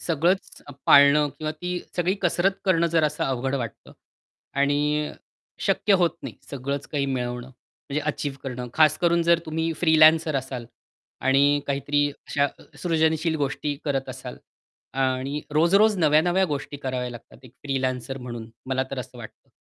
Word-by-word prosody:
सगळंच 170 +4 0 0.2
पाळणं 140 +1 +7
किंवा 155 -1 -2
ती 180 +3 -4 0.2
सगळी 180 +2 +1
कसरत 175 +2 +2
करणं 170 -3 +3
जरासं 155 -2 +1
अवघड 135 +1 -1
वाटतं. 120 -5 -6 0.6
आणि 145 +2 +1 0.5
शक्य 205 - +2
होत 175 -3 +3
नाही 130 -5 -7 0.2
सगळंच 140 +1 -4
काही 140 -2 -1
मिळवणं 125 -2 -3
म्हणजे 140 +3 -7
अचीव्ह 145 -2 -2
करणं, 125 -2 -5
खासकरून 170 +2 +3
जर 170 0 +4
तुम्ही 160 +1 -1
फ्रीलॅन्सर 160 -2 +5
असाल 130 -2 -4 0.6
आणि 140 +2 +3
काहीतरी 145 +1 +1
अशा 140 0 -1 0.4
सृजनशील 160 -1 +1
गोष्टी 145 +1 -2
करत 135 -2 -1
असाल 125 -1 -7 0.6
आणि 135 +2 0
रोज-रोज 200 +7 +4
नव्या-नव्या 175 +4 +3
गोष्टी 145 -3 -4
कराव्या 130 -3 -3
लागतात. 120 -2 -12
एक 125 - -14
फ्रीलॅन्सर 135 -1 -2
म्हणून, 120 -2 -7 0.2
मला 130 0 0
तर 135 - -4
असं 125 -1 -8
वाटतं. 115 - -12
145 Hz, 140 wpm, -24 LUFS, 130-160 Hz, 0.6 s, पाळणं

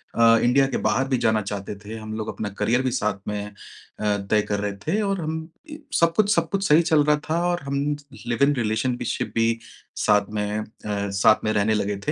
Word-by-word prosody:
अ, 115 0 +6
India 135 +3 +4
के - - -2
बाहर 135 +1 +1
भी 130 -2 +1
जाना 110 -2 +2
चाहते 100 0 -5
थे, 105 +2 -9
हम 110 0 -7
लोग 110 - -4
अपना 105 -2 -4
करियर 115 +5 +2
भी 130 - 0
साथ 105 -5 -1
में 105 0 -3
अ, 105 - -13 0.5
तय 105 0 +1
कर 100 - 0
रहे 100 0 -2
थे 215 - +1
और 195 -3 -1
हम 160 +1 -3 0.3
इ 300 - -7 0.2
सब 170 0 +3
कुछ 210 -1 +3
सब 165 -1 +1
कुछ 195 +1 -1
सही 150 +3 +6
चल 160 -3 +3
रहा 150 0 +4
था 165 +2 +1
और 175 0 0
हम 140 0 -3 0.5
लिव-इन 140 +5 +3
रिलेशन 115 +1 0
भी - - -5
शिप - - -2
भी 115 0 +2 0.4
साथ 105 -1 +3
में 105 0 -1
अ, - - -3 0.2
साथ 100 0 +2
में 110 - +2
रहने 105 +1 +2
लगे 105 -1 -1
थे। - - +3
115 Hz, 230 wpm, -24 LUFS, 105-145 Hz, 0.5 s, अ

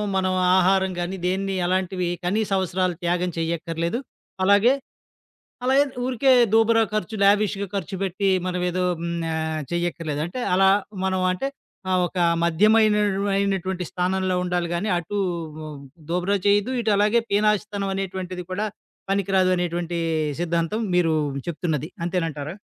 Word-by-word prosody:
మనం 185 -1 +1 0.2
ఆహారం 190 +1 +3
గానీ, 175 +2 -2
దేన్ని, 195 +1 -1
అలాంటివి 185 0 0 0.2
కనీస 210 +4 0
అవసరాలు 185 -1 -1
త్యాగం 175 +1 0
చేయక్కర్లేదు. 165 +4 -2 0.4
అలాగే, 200 +6 +5 0.9
అలాగే 265 +3 +4 0.2
ఊరికే 260 +1 +3 0.2
దూబరా 225 0 +4
ఖర్చు, 215 +1 -2
లావిష్‌గా 200 0 +2
ఖర్చు 195 -1 -3
పెట్టి 195 +1 0 0.2
మనం 180 0 -2
ఏదో 180 +1 -1 0.2
హ్మ్, 170 0 -2 0.2
ఆహ్, 160 0 -2
చెయ్యక్కర్లేదు 165 -4 -2
అంటే, 185 +9 -6
అలా 190 +1 +5 0.3
మనం 190 -1 0
అంటే, 185 +9 -2 0.4
ఆ - - +2
ఒక 180 - -6 0.3
మధ్యమైన 210 +6 +4
అయినటువ 200 0 0
అయినటువంటి 190 -2 -1
స్థానంలో 185 +1 0
ఉండాలి 175 -1 -1
గాని, 200 +5 -1
అటు 190 +5 -4 0.9
దూబరా 180 +3 +1
చేయద్దు, 205 +5 +2
ఇటు 220 -2 +1
అలాగే 210 +3 +3
పీనాసితనం 205 -1 +1
అనేటువంటిది 185 -2 -4
కూడా 205 +4 -1 0.4
పనికిరాదు 195 -1 +2
అనేటువంటి 175 -1 -2 0.4
సిద్ధాంతం 170 +4 -1
మీరు 175 -2 +3 0.3
చెప్తున్నది. 160 -3 -2
అంతేనంటారా? 165 -4 -2
185 Hz, 125 wpm, -23 LUFS, 175-200 Hz, 0.9 s, అలాగే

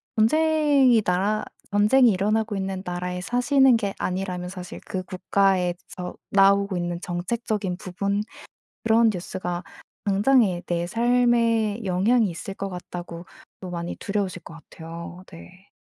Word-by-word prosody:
전쟁이 285 -1 +4
나라 195 +4 0 0.3
전쟁이 220 +5 +5
일어나고 210 +2 0
있는 190 -1 -3
나라에 180 0 -3
사시는 250 +4 +4
게 200 -3 -2
아니라면 180 -1 -3
사실 180 -1 -8
그 185 -3 -3
'국가에서 180 -1 -1 0.2
나오고 200 -1 +4
있는 175 0 -3
정책적인 190 +2 -2
부분 200 +3 -2 0.6
그런 225 0 +4
뉴스가 175 -1 -4 0.4
당장에 205 -2 +3
내 175 0 -1
삶에 235 -1 +2
영향이 205 +5 +3
있을 175 +3 -6
것 195 - -4
같다.'고 175 -1 -8 0.3
또 185 - -7
많이 170 -1 -4
두려우실 200 -3 -3
것 165 - -11
같아요. 170 +2 -10
네. 185 +3 -14
195 Hz, 285 characters per minute, -24 LUFS, 180-225 Hz, 0.6 s, 전쟁이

